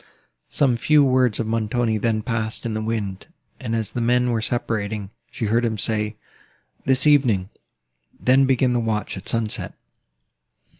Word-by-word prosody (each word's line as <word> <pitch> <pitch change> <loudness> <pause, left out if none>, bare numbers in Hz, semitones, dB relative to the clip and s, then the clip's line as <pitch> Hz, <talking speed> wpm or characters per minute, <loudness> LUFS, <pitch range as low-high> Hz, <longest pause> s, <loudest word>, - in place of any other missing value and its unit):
Some 130 -5 +2
few 150 +5 +4
words 130 -4 +2
of 115 - 0
Montoni 115 0 0
then 110 0 0
passed 115 -2 -3
in 115 - -2
the 110 - -2
wind; 105 -4 -3 0.3
and, 115 -3 -3
as 110 -3 -2
the 120 - -3
men 125 +1 +2
were 115 -2 0
separating, 110 -3 -2 0.2
she 115 - -4
heard 115 +3 +1
him 110 -2 -1
say, 105 0 -1 0.7
"This 130 +1 +2
evening, 125 -11 +3 0.7
then, 130 +2 +4
begin 130 -1 +2
the 120 - +1
watch 110 -2 -2
at - - -4
sunset." 115 -2 -2
115 Hz, 155 wpm, -22 LUFS, 110-125 Hz, 0.7 s, few